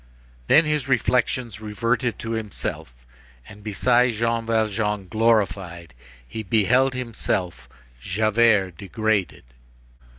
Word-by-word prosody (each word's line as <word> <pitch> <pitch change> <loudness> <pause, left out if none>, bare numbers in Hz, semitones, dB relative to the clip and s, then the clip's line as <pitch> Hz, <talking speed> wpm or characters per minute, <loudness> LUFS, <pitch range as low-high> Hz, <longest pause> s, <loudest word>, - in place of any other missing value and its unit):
Then 160 - +6
his 150 -3 -1
reflections 125 -2 0
reverted 115 +3 -1
to 115 - -6
himself 110 - -5 0.6
and 105 0 -13
beside 120 +4 +2
Jean 115 +1 -1
Valjean 105 -3 0
glorified 95 -6 0 0.3
he 110 - -6
beheld 115 +6 +2
himself, 95 - -3 0.3
Javert, 105 - +2
degraded. 105 -1 -1
110 Hz, 95 wpm, -23 LUFS, 100-120 Hz, 0.6 s, Then